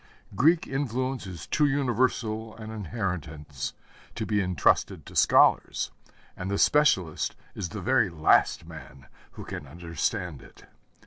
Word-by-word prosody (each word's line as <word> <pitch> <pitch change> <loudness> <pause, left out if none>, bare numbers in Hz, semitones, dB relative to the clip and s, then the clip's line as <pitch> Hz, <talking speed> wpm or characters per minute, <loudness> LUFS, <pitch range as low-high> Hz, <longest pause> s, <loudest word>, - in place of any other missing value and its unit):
Greek 160 - +4
influence 130 -3 -2
is 85 -6 -8
too 150 0 +2
universal 120 -5 0
an 110 0 -8
inheritance 85 - -4 0.4
to - - -3
be 105 -1 +1
entrusted 90 -6 +1
to - - -12
scholars, - - +4 0.4
and 95 +1 -5
the 100 - 0
specialist 95 - +2 0.2
is 95 -4 -4
the 105 -2 -6
very 120 -1 +3
last 80 -3 +3
man 70 0 -12 0.3
who - - -9
can 70 - -7
understand 85 0 -3
it. - - -17
100 Hz, 130 wpm, -27 LUFS, 85-130 Hz, 0.4 s, Greek